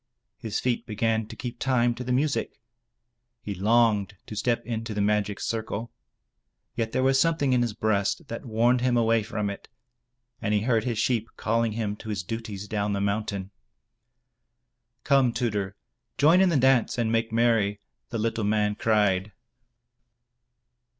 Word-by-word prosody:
His 110 -4 -3
feet 125 -1 -1
began 110 0 0
to - - -9
keep 120 -1 -6
time 120 -2 +2
to 120 +2 -6
the 125 - -3
music. 140 +3 0 0.8
He 105 - -4
longed 105 0 +2
to 110 - -8
step 120 +2 0
into 115 -2 -4
the - - -2
magic 105 0 +1
circle. 110 0 -3 0.8
Yet 110 -1 -2
there 130 - 0
was 135 0 +4
something 150 -4 +2
in 125 - +3
his 120 -3 -1
breast 110 +8 0
that 115 - -6
warned 120 +1 +2
him 125 -1 +2
away 115 -1 +3
from 105 -1 -3
it, 100 0 -6 0.7
and 105 -2 0
he 105 - +2
heard 115 -1 +1
his 120 -3 -1
sheep 115 -1 0
calling 115 0 0
him 105 -2 -2
to 110 - -9
his 100 -3 -2
duties 105 -1 -6
down 105 -1 -1
the 100 - -1
mountain. 100 -1 -2 1.5
"Come, 135 -3 +4
Tudur, 105 -6 -2 0.4
join 165 +6 +5
in 190 - +5
the 165 - +2
dance, 130 -3 +3
and 115 -2 0
make 115 0 0
merry,*' 115 -3 +2 0.3
the 115 - -3
little 115 0 -1
man 105 0 +1
cried. 105 -2 +1
115 Hz, 160 wpm, -26 LUFS, 105-120 Hz, 1.5 s, join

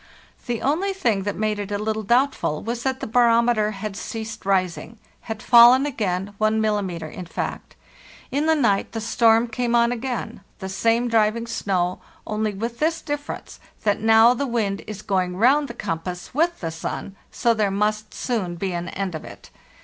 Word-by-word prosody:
The 240 -2 -2
only 350 +9 +1
thing 225 - 0
that - - -4
made 215 -1 -1
it 205 -1 -4
a 205 - 0
little 220 +1 -2
doubtful 240 - +1
was 235 +2 -3
that 265 +1 -2
the - - -2
barometer 235 -2 +3
had 210 -1 -5
ceased 220 -1 -6
rising— 190 +3 0 0.3
had 220 -1 -5
fallen 245 +3 +7
again 200 -7 -2
1 215 +1 +2
millim.,in 185 -5 -2
fact. - - -5 0.6
In 290 +3 0
the 320 - +4
night 225 -10 +1
the 225 - -2
storm 225 +1 +3
came 240 +1 -1
on 235 0 +4
again—the 235 -6 -5
same 230 +5 +1
driving 225 0 +2
snow, 185 -5 -1 0.3
only 215 0 -1
with 230 +4 -5
this 325 +2 +1
difference, 290 -1 -6 0.2
that 205 -1 +1
now 225 +2 +6
the 275 +3 -2
wind 215 -5 -1
is 210 -1 -7
going 185 -3 -1
round 275 +7 +4
the 235 - -8
compass 180 -1 -5
wrth 335 +5 +2
the 165 -2 -3
sun, 165 +4 -5
so 235 - +1
there 215 -3 +1
must 210 +2 -1
soon 205 -9 -2
be 185 +1 -3
an 175 0 -4
end 195 -2 -3
of 155 - -6
it. - - -12
220 Hz, 175 wpm, -23 LUFS, 195-240 Hz, 0.6 s, fallen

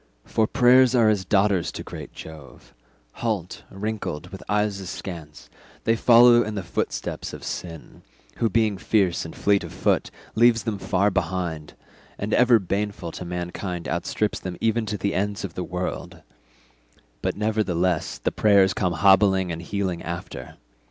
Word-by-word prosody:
For 110 -1 +1
prayers 125 +1 +5
are 115 -3 +5
as 100 -3 0
daughters 100 -2 +2
to - - -6
great - - -9
Jove; 80 -3 -12 0.5
halt, 105 -7 -2
wrinkled, 100 -5 -4
with - - -9
eyes 105 -1 0
askance, 85 -4 -8 0.4
they 115 - +2
follow 120 +1 +7
in 110 -2 -3
the 95 - -3
footsteps 85 - -4
of - - -9
sin, 85 -3 -7 0.4
who, 115 - +1
being 105 -1 +1
fierce 95 -5 +1
and 80 - -9
fleet 100 -1 +2
of - - -8
foot, - - 0 0.2
leaves 115 -1 +4
them 105 -4 -3
far 100 +2 +1
behind 85 -4 -2
him, - - -31 0.4
and 105 +2 -3
ever 125 -1 +6
baneful 100 -2 -3
to - - -7
mankind 90 0 -5
outstrips 85 +5 -1
them 90 -2 -6
even 115 0 0
to 105 - -2
the 100 0 -1
ends 100 +2 -2
of 95 -4 -5
the 90 - -4
world; 90 +1 -5 1.0
but - - -2
nevertheless 95 -6 0
the - - -2
prayers 100 -3 +4
come 90 -1 0
hobbling 95 0 +4
and 85 0 -5
healing 95 -1 -3
after. 85 +2 -7
100 Hz, 160 wpm, -24 LUFS, 90-110 Hz, 1.0 s, follow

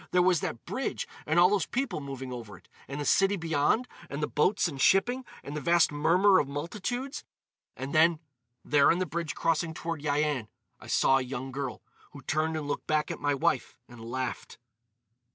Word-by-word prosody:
There 180 0 +3
was 180 -3 +4
that 115 - -5
bridge, - - -3 0.2
and 160 +3 +3
all 180 +1 +7
those 200 -6 +1
people 265 - -2
moving 135 -2 -6
over 110 -5 -8
it; 90 - -22 0.2
and 140 +2 -5
the 145 - -3
city 195 +5 +3
beyond, 165 - +1 0.2
and 140 - -4
the - - +1
boats 185 +5 +2
and 140 -5 -5
shipping, 245 - +3 0.2
and 145 - -7
the 150 - -3
vast 170 -1 +4
murmur 180 +7 +4
of 140 - 0
multitudes.... 210 - -4 0.5
And 135 +2 -5
then, 160 +1 +5 0.5
there 145 -1 +5
on 170 - +1
the 185 - 0
bridge 165 0 -4
crossing 165 0 0
toward 165 -2 -4
Yian, 145 -5 0 0.3
I - - -13
saw 135 0 +4
a - - -2
young 130 +1 -5
girl, 130 -3 -5 0.3
who 140 - -11
turned 160 0 0
and 150 -2 -4
looked 145 - -3
back 155 -1 +1
at - - -5
my 145 -1 +1
wife 130 -2 0
and 120 -2 -12
laughed." 130 +3 -4
150 Hz, 195 wpm, -29 LUFS, 140-175 Hz, 0.5 s, all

